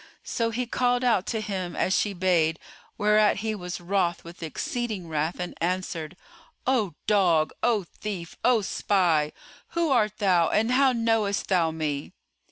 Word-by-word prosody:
So 230 -1 -1
he 245 +2 -2
called 245 +1 +1
out 230 -7 +2
to 220 -2 -1
him 190 -5 -4
as 190 - +1
she 205 - +1
bade, 170 -3 +2 0.4
whereat 210 0 +3
he 220 - 0
was 180 -4 -5
wroth 175 -1 0
with 170 +1 -12
exceeding 205 +4 -3
wrath 155 +2 -2
and 180 0 -4
answered, 175 -1 -2 0.5
"O 235 -8 +1
dog, 175 -7 +3
O 225 -5 +2
thief, 180 -1 -7
O 245 -3 +4
spy, 170 -7 +1 0.5
who 335 -3 +2
art 215 -4 +2
thou 180 -5 +3
and 225 +3 +1
how 265 +1 +4
knowest 225 -4 0
thou 175 -4 +3
me?" 150 -3 -3
195 Hz, 155 wpm, -26 LUFS, 170-225 Hz, 0.5 s, O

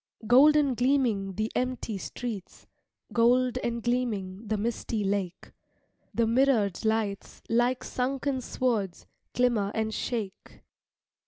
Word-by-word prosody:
Gold 270 +7 +7
and 285 -4 +3
gleaming 240 -7 +1
the 215 +2 -2
empty 250 -5 -2
streets, 215 -2 -6 0.5
Gold 250 +2 +3
and 235 -2 -3
gleaming 220 -5 -2
the 215 0 0
misty 225 0 -2
lake, 195 -2 -2 0.6
The 230 - +1
mirrored 230 -5 +2
lights 220 -2 -2
like 245 +2 +2
sunken 265 +1 -2
swords, 220 -8 -2 0.3
Glimmer 235 -5 +2
and 220 0 -1
shake. 215 -6 -5
235 Hz, 110 wpm, -28 LUFS, 205-250 Hz, 0.6 s, Gold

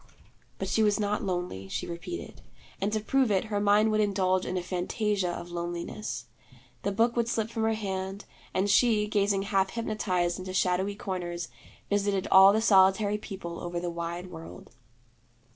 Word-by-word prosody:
But 195 - -3
she 210 +4 +1
was 210 0 +3
not 210 +1 0
lonely, 175 - -3
she - - -3
repeated; 170 - -7 0.4
and 200 +2 0
to 215 - 0
prove 260 +3 +2
it, 195 -2 +2
her 205 - +2
mind 205 +2 +4
would 215 0 +2
indulge 185 -2 +1
in 185 - -2
a 180 - -2
fantasia 185 +2 -1
of 175 0 -6
loneliness. 175 - -4 0.6
The 200 - -1
book 230 +4 +2
would 235 -1 +1
slip 225 -1 -1
from 225 - -3
her 225 - +2
hand, 195 -1 -4 0.3
and 190 +2 +1
she, 215 0 +4
gazing 200 -2 +1
half 195 -1 +1
hypnotized 190 -6 -1
into 185 0 -6
shadowy 190 +2 +1
corners, 175 -3 -4 0.4
visited 200 -1 0
all 190 +1 +9
the 220 +2 +2
solitary 200 0 +4
people 185 -5 -7
over 175 0 -4
the 175 0 -3
wide 170 +2 -5
world. 160 - -10
195 Hz, 170 wpm, -28 LUFS, 180-210 Hz, 0.6 s, all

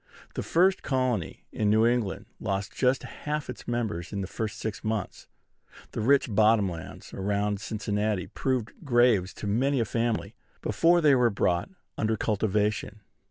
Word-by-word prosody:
The - - -3
first 185 +3 +3
colony 130 - -1
in 105 -2 0
New 110 +2 +4
England 120 -5 0
lost 100 -1 -2
just 130 0 +1
half 150 0 -4
its - - -12
members 110 -7 -2
in 100 -2 -3
the - - -2
first 110 +1 -4
six 110 -2 -4
months. 110 -3 -3 0.6
The - - -3
rich 135 +4 +4
bottom 105 -1 +4
lands 85 -3 -8
around 100 +1 -1
Cincinnati 105 -2 -1
proved 130 -4 -2
graves 120 - +3
to - - -7
many 130 +7 +1
a 115 - +2
family 115 +1 -1 0.3
before 175 +1 +3
they 150 -3 +6
were 125 -2 +4
brought 90 - 0 0.3
under 110 0 +1
cultivation. 105 0 0
110 Hz, 155 wpm, -27 LUFS, 105-125 Hz, 0.6 s, they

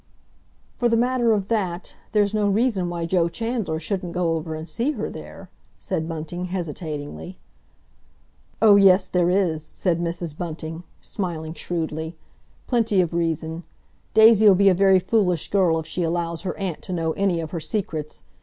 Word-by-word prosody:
"For 240 -1 +2
the 230 - +3
matter 245 -1 +2
of 200 -3 +1
that, 190 -6 -2 0.2
there's 210 -2 +2
no 210 -1 +2
reason 200 -4 +1
why 170 -1 -3
Joe 170 0 +1
Chandler 225 -6 -2
shouldn't 180 +1 -3
go 175 -2 +1
over 160 0 -3
and 155 +1 -7
see 245 +10 -1
her 220 -6 -4
there," 75 0 -10 0.3
said 160 +1 -3
Bunting 165 +2 -5
hesitatingly. 165 -1 -5 1.3
"Oh, 205 -2 +8
yes, 190 -1 +5
there 180 -1 +2
is," 180 -4 +1
said 170 +2 -1
Mrs. 170 -2 -3
Bunting, 165 0 -6 0.2
smiling 165 -5 -4
shrewdly. 160 -1 -4 0.5
"Plenty 225 -5 +1
of 175 -2 +1
reason. 165 -1 -2 0.5
Daisy'll 220 -2 +7
be 200 +1 +5
a - - +5
very 190 +1 +5
foolish 185 -3 0
girl 185 -5 +3
if 160 - -4
she 180 - -4
allows 170 0 -1
her 190 - -4
aunt 190 -5 -4
to 185 - -6
know 165 -2 0
any 190 -1 0
of 160 -2 -5
her 170 - -3
secrets. 155 - -4
175 Hz, 165 wpm, -23 LUFS, 165-200 Hz, 1.3 s, Oh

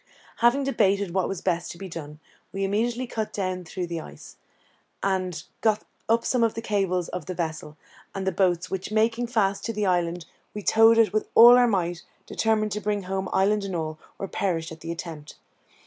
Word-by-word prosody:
Having 240 +4 +3
debated 200 -8 +1
what 190 -1 +1
was 195 - -4
best 175 -2 -1
to - - -10
be 195 - -7
done, 150 -3 -8 0.3
we 195 0 -3
immediately 230 +5 0
cut 220 -3 -4
down 185 -2 -3
through 180 +2 -4
the 170 -1 -4
ice, - - -12 0.7
and 185 -4 -1 0.2
got 215 -1 +2 0.3
up 230 +1 +3
some 250 -2 +2
of 225 - +1
the 225 - -4
cables 190 -5 0
of 180 -4 -6
the 185 - -4
vessel, 160 -3 -4 0.4
and 195 -1 -3
the 190 - +1
boats, 180 -1 +1
which, 190 +1 -4
making 225 +2 +1
fast 200 -4 0
to 230 - -2
the 210 -1 -1
island, 175 -2 0 0.3
we 210 - -5
towed 225 +2 +6
it 225 -2 +4
with 215 - 0
all 240 +2 +10
our 245 0 +5
might, 175 -5 -1 0.2
determined 215 -1 0
to 210 +2 -3
bring 205 -1 -1
home 190 0 -3
island 200 +2 +2
and 195 -2 -4
all, 155 -1 -3 0.2
or 195 - -4
perish 165 -5 -2
in 160 - -9
the 165 +1 -6
attempt. 165 -3 -7
195 Hz, 200 wpm, -25 LUFS, 175-215 Hz, 0.7 s, all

